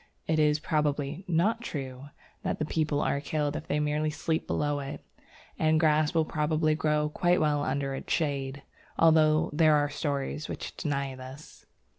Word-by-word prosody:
It 160 0 +1
is 150 -1 +4
probably 150 +1 -1
not 180 +7 +1
true 135 - -6 0.4
that - - -2
people 155 -2 0
are 140 - 0
killed 150 0 -1
if 160 - -6
they 150 - 0
merely 150 +1 0
sleep 160 +1 -2
below 145 -1 0
it, 140 0 -7 0.5
and 155 0 +3
grass 155 0 +3
will 160 -1 +3
probably 155 0 +1
grow 150 -1 +1
quite 175 +3 +2
well 150 -2 +1
under 135 0 -1
its 135 - -6
shade, 140 -3 -1 0.3
although 155 -1 +4
there 155 0 +5
are 145 0 +2
stories 145 0 -3
which - - -6
deny 140 -2 -2
this. 130 +3 -12
150 Hz, 160 wpm, -28 LUFS, 145-155 Hz, 0.5 s, there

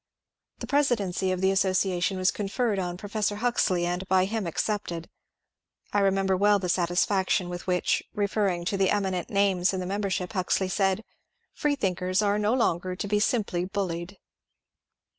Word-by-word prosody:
The - - -6
presidency 215 -10 +1
of 185 0 -2
the 190 0 +3
association 190 -1 +1
was 185 0 +2
conferred 210 +1 -1
on 175 -1 -3
Pro 205 - -8
fessor 210 0 -1
Huxley, 205 -6 +1
and 180 +2 -2
by 185 -1 +3
him 215 -1 -2
accepted. 170 -2 -3 0.8
I 205 - +3
remember 195 -1 +2
well 205 +2 +4
the 185 -2 -3
satisfaction 180 +1 +1
with 175 +1 -7
which, 180 -1 +1
referring 200 -4 0
to 195 - -1
the 195 -1 +2
eminent 190 -3 -1
names 195 -2 +2
in - - -2
the 180 - -3
membership, 195 -1 -2
Huxley 185 0 0
said, 195 +2 +1 0.3
" - - -49
Freethinkers 190 - 0
are 205 0 +2
no 210 +3 +2
longer 185 -6 0
to 200 - -4
be 210 +1 +1
simply 205 -6 0
buUied." 185 -1 -4
190 Hz, 160 wpm, -27 LUFS, 180-205 Hz, 0.8 s, well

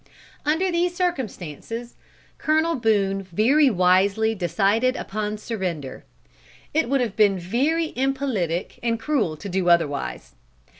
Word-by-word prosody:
Under 345 +5 +2
these 345 +1 0
circumstances, 235 - -4 0.5
Colonel 315 +2 +2
Boone 205 -6 +1
very 225 - +3
wisely 195 +3 +3
decided 200 - +1
upon 210 -1 -3
surrender. 180 - -5 0.7
It 320 -3 +1
would 275 -1 +2
have 230 -5 -2
been 205 -3 +4
very 275 - 0
impolitic 255 - -1
and 230 -1 0
cruel 225 - 0
to 155 - -8
do 185 -1 0
otherwise. 145 - 0
220 Hz, 115 wpm, -23 LUFS, 185-270 Hz, 0.7 s, been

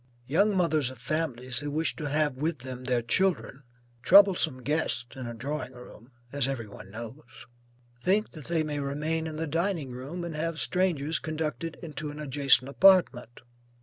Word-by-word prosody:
Young 195 +9 +2
mothers 155 -7 +2
of 130 - -10
families 125 -2 -2
who 145 - -4
wish 155 +3 -1
to 150 -3 -3
have 150 0 +1
with 155 +4 -2
them 130 -1 -7
their 125 -2 +1
children, 165 0 0 0.4
(troublesome 185 -7 +5
guests, 145 -4 0
in 130 -2 -6
a 120 - -6
drawing 130 +1 -4
room, 125 -1 -14 0.2
as 140 -2 +1
every 135 -4 -3
one 100 -1 -12
knows,) 115 +5 -8 0.8
think 200 - +1
that 155 -5 -10
they 165 -2 0
may 150 -1 -3
remain 155 +3 -2
in 155 - -6
the 160 +1 -2
dining 165 -2 -1
room, 140 +8 -6
and 170 -2 -5
have 165 +1 -2
strangers 165 -5 0
conducted 160 +1 -4
into 155 -2 -5
an 145 - -8
adjacent 140 -3 +3
apartment. 140 - +3
150 Hz, 170 wpm, -28 LUFS, 130-165 Hz, 0.8 s, troublesome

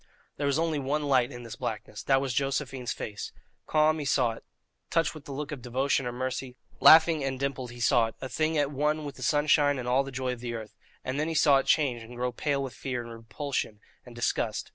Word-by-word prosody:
There 145 - -1
was 140 0 +2
only 160 -2 0
one 145 +3 -1
light 130 -3 +2
in 120 -1 -8
this 115 - -8
blackness 105 -1 -5
that 135 -1 +4
was 135 -2 -2
Josephine's 135 -2 -1
face. 105 -1 -5 0.4
Calm 155 +1 +3
he 145 - -4
saw 130 -4 +2
it, 115 - -10 0.5
touched 165 0 +1
with 155 -3 -11
the - - -8
look 145 +2 -5
of 145 -4 -6
devotion 130 +2 0
or - - -2
mercy; 130 +1 -4 0.2
laughing 160 -1 +7
and 135 -1 -2
dimpled 135 -2 -3
he 120 0 -11
saw 120 -1 +4
it, 115 - -10
a 130 - -5
thing 155 +4 0
at 145 -1 +1
one 150 +2 0
with 140 -2 -7
the - - -11
sunshine 145 0 +3
and 125 -1 -5
all 130 +2 +3
the 135 - -7
joy 130 -1 -2
of 125 -1 -10
earth; 115 -3 -5 0.3
and 130 +2 -3
then 155 - 0
he 165 - -2
saw 145 -2 +6
it - - -4
change, 130 -6 +2
and 115 +2 -11
grow 125 +1 -1
pale 140 +3 -1
with 130 - -5
fear, 125 -3 -4
and 115 - -10
repulsion, 115 0 -4 0.2
and 120 -1 -13
disgust. 120 - -1
135 Hz, 235 wpm, -28 LUFS, 125-145 Hz, 0.5 s, laughing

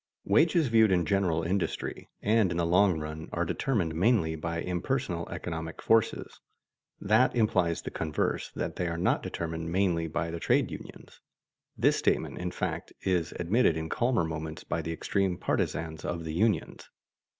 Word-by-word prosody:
Wages 160 - +4
viewed 110 -3 +5
in 90 -2 +3
general 90 -4 +1
industry, 90 +3 -2
and 110 -2 +3
in 85 - -2
the 85 - +1
long 90 0 +4
run, 80 +1 -6
are - - -1
determined 100 -12 0
mainly 90 -2 +2
by 85 +1 -3
impersonal 90 0 -2
economic 80 -1 -5
forces. 115 -1 +1 0.6
That 110 +6 +3
implies 90 -8 +2
the - - -5
converse, 75 -2 -1
that - - -3
they 90 - -1
are 85 0 -2
not 85 - +1
determined 85 0 -4
mainly 85 -3 +1
by 85 +1 -2
the 85 - -4
trade - - +2
unions. - - -10 0.6
This - - +3
statement, - - 0
in - - -2
fact, - - -4
is 90 -4 0
admitted 90 -1 +2
in 80 0 -4
calmer 120 -2 +1
moments 80 -1 -5
by - - -2
the 80 - -4
extreme 95 +2 0
partisans 80 -2 -2
of 85 -1 -3
the 80 - -4
unions. 100 0 0
85 Hz, 160 wpm, -29 LUFS, 80-100 Hz, 0.6 s, viewed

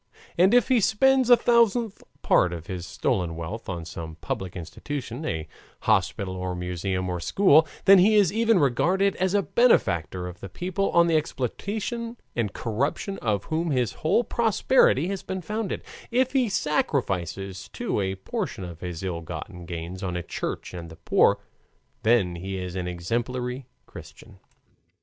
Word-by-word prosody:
And 185 +3 +5
if 245 - +4
he 250 -3 +4
spends 260 +5 +3
a 245 - +9
thousandth 235 -2 +2 0.2
part 90 -1 +3
of 85 -2 -7
his 90 -2 -6
stolen 90 -10 -1
wealth 85 +8 -6
on 85 -3 -4
some 80 -1 -7
public 90 +2 -5
institution, 125 - -6
a 80 0 -3 0.3
hospital 95 -2 +1
or 90 0 -3
museum 90 +1 -2
or 90 -1 -2
school, 160 - +4 0.2
then 195 0 +8
he 210 +4 +5
is 200 -4 +4
even 225 -1 +3
regarded 180 +8 +2
as 185 +1 0
the 205 -1 +3
benefactor 90 - +2
of 90 0 -8
the 95 - -8
people 185 - -2
on 170 0 +5
the 165 -1 +2
exploitation 215 - -3 0.2
and 115 -4 -1
corruption 140 - -2
of 105 -4 0
whom 165 +1 -1
his 125 -6 0
whole 185 +9 +3
prosperity 225 - +3
has 195 -1 -3
been 190 -1 -5
founded: 215 +2 -3 0.3
if 255 +2 +2
he 255 -4 +2
sacrifices, 95 - -1
too, - - -3
a 95 0 -1
portion 95 0 -4
of 85 -2 -8
his 90 -1 -6
ill 90 -3 -3
gotten 85 +2 -7
gains 85 +2 -6
on 90 -3 -3
a 90 - -4
Church - - -5
and 85 -2 -7
the 80 - -11
poor, - - +3 0.6
then 105 -7 +2
he 95 +2 -5
is 90 -1 -5
an 90 -1 -3
exemplary 120 +8 -3 0.2
Christian. - - -13
120 Hz, 165 wpm, -25 LUFS, -, 0.6 s, a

